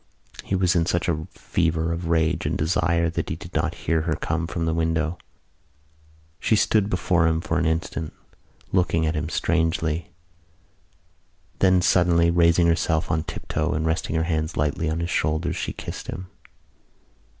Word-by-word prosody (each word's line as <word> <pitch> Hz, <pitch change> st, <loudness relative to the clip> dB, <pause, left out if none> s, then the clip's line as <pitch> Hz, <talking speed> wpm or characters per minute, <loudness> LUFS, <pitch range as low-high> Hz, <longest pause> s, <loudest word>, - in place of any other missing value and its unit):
He 95 Hz, -, -1 dB
was 90 Hz, 0 st, +2 dB
in 85 Hz, -1 st, +2 dB
such 85 Hz, +1 st, 0 dB
a 80 Hz, -2 st, -1 dB
fever 80 Hz, 0 st, -1 dB
of 85 Hz, 0 st, -4 dB
rage 80 Hz, -1 st, +1 dB
and -, -, -1 dB
desire 85 Hz, +1 st, +1 dB
that -, -, -3 dB
he -, -, -2 dB
did -, -, -11 dB
not -, -, 0 dB
hear 80 Hz, 0 st, +2 dB
her 80 Hz, 0 st, -1 dB
come 85 Hz, 0 st, -2 dB
from 85 Hz, -1 st, -2 dB
the 80 Hz, -, 0 dB
window. 80 Hz, 0 st, 0 dB, 1.2 s
She 110 Hz, -, +2 dB
stood 105 Hz, -1 st, +2 dB
before 90 Hz, -3 st, +2 dB
him 80 Hz, 0 st, +1 dB
for 85 Hz, +1 st, -1 dB
an 85 Hz, -, +1 dB
instant, 80 Hz, 0 st, -2 dB, 0.6 s
looking 85 Hz, -3 st, +2 dB
at 80 Hz, -, 0 dB
him 75 Hz, -1 st, -2 dB
strangely. 80 Hz, -1 st, 0 dB, 1.5 s
Then, 95 Hz, -2 st, +4 dB
suddenly 85 Hz, -2 st, +4 dB
raising 85 Hz, 0 st, +4 dB
herself 80 Hz, -1 st, +1 dB
on 80 Hz, -1 st, +1 dB
tiptoe -, -, -2 dB
and 80 Hz, +1 st, -1 dB
resting 80 Hz, 0 st, -1 dB
her 80 Hz, -, +2 dB
hands 80 Hz, -1 st, -2 dB
lightly 75 Hz, +2 st, 0 dB
on 80 Hz, +2 st, -2 dB
his 85 Hz, -, -2 dB
shoulders, 80 Hz, +3 st, 0 dB
she -, -, -3 dB
kissed -, -, -7 dB
him. 90 Hz, +2 st, -6 dB
85 Hz, 165 wpm, -24 LUFS, 80-85 Hz, 1.5 s, Then